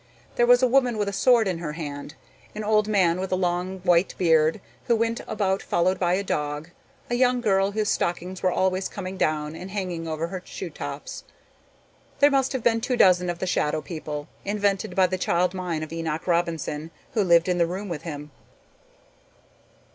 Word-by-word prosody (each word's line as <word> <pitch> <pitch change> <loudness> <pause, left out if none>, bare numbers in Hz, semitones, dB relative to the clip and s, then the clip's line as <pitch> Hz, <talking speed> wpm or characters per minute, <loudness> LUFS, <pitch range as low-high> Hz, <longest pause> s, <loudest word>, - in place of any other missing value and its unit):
There 240 - +3
was 245 +1 +6
a - - +6
woman 250 -2 +2
with 205 -1 0
a 200 - -2
sword 230 +1 +4
in 180 -3 -2
her 155 -3 -4
hand, 145 -3 -6 0.4
an 215 - -4
old 215 0 +2
man 185 -5 +2
with 190 0 -4
a - - +3
long 180 +1 -1
white 175 0 +2
beard 160 +1 +3 0.3
who 235 - +3
went 230 +1 0
about 195 -3 0
followed 180 +2 +1
by 180 -1 +2
a 200 - -1
dog, 150 -1 -3 0.4
a - - +1
young 250 0 +3
girl 195 -3 +2
whose 215 0 0
stockings 180 +2 -2
were 185 - +3
always 185 +1 0
coming 190 -1 -6
down 155 -3 -1
and 185 +3 -8
hanging 180 -4 -4
over 160 0 -2
her 185 0 -5
shoe - - -7
tops. - - -7 0.9
There 285 0 +5
must 270 -1 +2
have 260 -3 -3
been 230 -1 +2
two 250 +1 -1
dozen 180 -3 +5
of 175 - -2
the 185 - -3
shadow 155 -3 0
people, 150 -3 -6 0.2
invented 205 0 -1
by 190 -2 +5
the 185 0 -2
child 180 +1 +1
mind 175 -4 -3
of 155 - -7
Enoch 165 -1 -3
Robinson, 165 -3 -1 0.2
who 215 - +2
lived 170 -2 +4
in 180 -1 +1
the 170 - +3
room 190 +4 -5
with 170 -5 -4
him. 150 -2 -7
185 Hz, 195 wpm, -25 LUFS, 165-205 Hz, 0.9 s, was